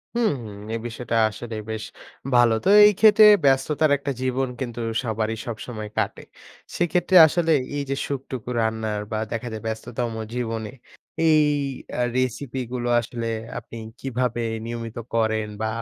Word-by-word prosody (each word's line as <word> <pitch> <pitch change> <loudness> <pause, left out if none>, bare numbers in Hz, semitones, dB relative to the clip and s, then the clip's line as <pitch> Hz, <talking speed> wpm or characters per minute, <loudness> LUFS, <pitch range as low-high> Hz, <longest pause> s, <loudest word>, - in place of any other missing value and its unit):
হুম। 235 -6 +2 0.4
এই 115 - -2
বিষয়টা 120 0 -4
আসলে 115 +1 -7
বেশ 110 0 -4 0.5
ভালো। 120 -2 +5
তো - - +4 0.2
এইক্ষেত্রে 210 +1 +6 0.2
ব্যস্ততার 140 +3 +3
একটা 140 0 -4
জীবন 130 +1 0
কিন্তু 120 -3 -5 0.2
সবারই 110 -1 -2
সবসময় 110 -2 -6
কাটে। - - -1 0.5
সেক্ষেত্রে 175 +2 +1
আসলে 165 +1 0 0.3
এইযে 140 -1 -2
সুখটুকু 130 -3 -5
রান্নার 110 -1 -1
বা 110 - -1
দেখা 115 +1 -3
যায় 110 - -6
ব্যস্ততম 115 +1 -4 0.2
জীবনে 115 -3 -3 0.6
এই 155 -1 +5 0.6
আ - - +2
recipe 130 +1 -2
গুলো 120 -1 -2
আসলে 115 0 -5 0.3
আপনি 115 0 -11 0.2
কিভাবে 125 -2 -2 0.2
নিয়মিত 115 -1 -6 0.2
করেন 110 -1 +1
বা 110 - 0
120 Hz, 135 wpm, -23 LUFS, 110-135 Hz, 0.6 s, এইক্ষেত্রে